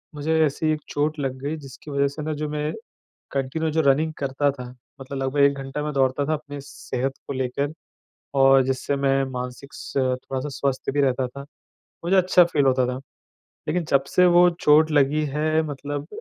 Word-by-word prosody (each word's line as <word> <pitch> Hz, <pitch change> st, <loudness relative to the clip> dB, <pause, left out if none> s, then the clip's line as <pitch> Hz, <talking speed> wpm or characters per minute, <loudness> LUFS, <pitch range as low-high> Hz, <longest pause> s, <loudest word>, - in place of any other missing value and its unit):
मुझे 160 Hz, +2 st, 0 dB
ऐसी 155 Hz, +2 st, 0 dB
एक 150 Hz, -, -4 dB
चोट 150 Hz, +1 st, -1 dB
लग 135 Hz, -2 st, -2 dB
गई, 145 Hz, +3 st, -2 dB
जिसकी 145 Hz, +1 st, -11 dB
वजह 140 Hz, 0 st, +2 dB
से 140 Hz, +2 st, -6 dB
ना, 155 Hz, -, -2 dB
जो 150 Hz, 0 st, -3 dB
मैं 150 Hz, 0 st, -2 dB, 0.6 s
कन्टिन्यू 140 Hz, +4 st, -1 dB
जो 160 Hz, +1 st, +1 dB
रनिंग 155 Hz, +4 st, +1 dB
करता 140 Hz, +1 st, 0 dB
था, 125 Hz, -3 st, -8 dB, 0.3 s
मतलब 135 Hz, +1 st, -6 dB
लगभग 135 Hz, +2 st, 0 dB
1 140 Hz, 0 st, +5 dB
घंटा 135 Hz, +2 st, -4 dB
मैं 150 Hz, -, -2 dB
दौड़ता 135 Hz, 0 st, +1 dB
था 155 Hz, -, 0 dB
अपनी 145 Hz, -1 st, -7 dB
सेहत 135 Hz, -1 st, -4 dB
को -, -, -4 dB
लेकर, 135 Hz, +2 st, -2 dB, 0.6 s
और 135 Hz, 0 st, +6 dB
जिससे 135 Hz, +2 st, -1 dB
मैं 135 Hz, 0 st, +2 dB
मानसिक 125 Hz, +2 st, -6 dB
स -, -, -9 dB
थोड़ा-सा 130 Hz, +1 st, -1 dB
स्वस्थ 135 Hz, -1 st, -2 dB
भी 145 Hz, -, +1 dB
रहता 130 Hz, -2 st, +1 dB
था। 140 Hz, +3 st, -10 dB, 0.7 s
मुझे 185 Hz, +3 st, +2 dB
अच्छा 185 Hz, -1 st, +6 dB
फ़ील 155 Hz, -5 st, +1 dB
होता 130 Hz, -1 st, +3 dB
था। 125 Hz, -, -2 dB, 0.7 s
लेकिन 170 Hz, +3 st, 0 dB
जब 135 Hz, -1 st, +3 dB
से 180 Hz, -, +4 dB
वो 175 Hz, 0 st, +6 dB
चोट 155 Hz, +1 st, +5 dB
लगी 145 Hz, +1 st, +3 dB
है, 155 Hz, +2 st, +1 dB
मतलब 145 Hz, 0 st, -5 dB
140 Hz, 190 wpm, -24 LUFS, 135-150 Hz, 0.7 s, और